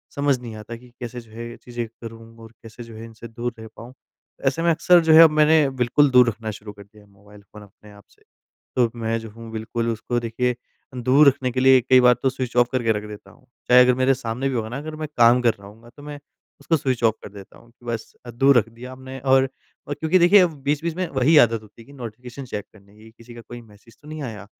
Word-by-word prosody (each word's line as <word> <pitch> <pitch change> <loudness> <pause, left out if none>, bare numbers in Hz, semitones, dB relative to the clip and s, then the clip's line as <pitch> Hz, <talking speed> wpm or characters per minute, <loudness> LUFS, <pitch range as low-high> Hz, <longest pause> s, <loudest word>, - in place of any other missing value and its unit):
समझ 140 -1 +1
नहीं 115 -3 -9
आता 110 +2 -9
कि 125 +1 -16
कैसे 120 0 -7
जो 110 -2 -21
है 115 +1 -8
ये 120 - -11
चीज़ें 120 -1 -7
करूँ, 115 0 -13
और 115 - -13
कैसे 115 +2 -11
जो 115 -1 -13
है 110 - -10
इनसे 115 0 -12
दूर 120 +2 -5
रह 110 - -9
पाऊँ? 120 +2 -12 0.5
ऐसे 135 +5 0
में 170 - +2
अक्सर 175 +2 +4
जो 160 -1 +4
है 160 - +9
अब 165 - +7
मैंने 155 -1 +4
बिल्कुल 125 +4 +3
दूर 125 -1 +6
रखना 110 -1 -6
शुरू 105 0 -11
कर 100 0 -14
दिया 105 +1 -21
है 100 - -24
मोबाइल 105 +1 -19
फ़ोन 105 +1 -16
अपने 105 +1 -19
आप 100 -1 -17
से। - - -29 0.6
तो 125 - +4
अब - - -9
मैं 115 +1 -1
जो 110 - -10
हूँ 115 +1 -12
बिल्कुल 115 +1 -4
उसको 115 +2 -3
देखिए 120 +2 -2
अ, 125 +2 -19
दूर 130 +4 +4
रखने 130 -2 0
के 130 +1 -2
लिए 130 0 +6
कई 130 +1 +4
बार 125 0 +5
तो 135 - +2
स्विच 130 -2 -6
ऑफ 120 0 +4
करके 120 -3 +1
रख 105 -1 -5
देता 100 -2 -12
हूँ। 130 +2 -23 0.2
चाहे 125 0 +7
अगर 125 0 +3
मेरे 130 +1 +2
सामने 125 +1 -4
भी 135 - -3
होगा 110 -2 -3
ना 125 +4 -6
अगर 155 +2 -8
मैं 155 -1 -6
काम 120 +1 +5
कर 115 -2 +2
रहा 100 - -14
होऊँगा 115 +3 -17
तो 145 - -14
मैं 145 0 -8 0.4
उसको 165 - 0
स्विच 130 -5 -2
ऑफ 110 -1 +3
कर - - -9
देता 100 -2 -14
हूँ 120 - -21
कि 120 +1 -22
बस 115 -1 -5
अ, 120 - -7
दूर 135 +2 +4
रख 115 - -1
दिया 120 +3 -11
आपने 130 +1 -10
और 135 0 +3 0.4
और 145 - -3
क्योंकि 160 +5 +1
देखिए 180 +4 +6
अब 180 -2 +3
वो 155 - -14
बीच-बीच 150 +4 -2
में 185 0 -2
वही 140 +4 +2
आदत 115 -1 -3
होती 110 +2 -17
है - - -21
कि 140 - -16
नोटिफ़िकेशन 125 +1 -9
चेक 105 -5 -6
करने 100 -1 -21
की। 110 +1 -16
किसी 115 +1 -16
का 120 - -10
कोई 120 +1 -11
मैसेज 110 +1 -20
तो 150 - -15
नहीं 155 -1 -7
आया? 110 -6 -8
120 Hz, 270 wpm, -22 LUFS, 115-135 Hz, 0.6 s, है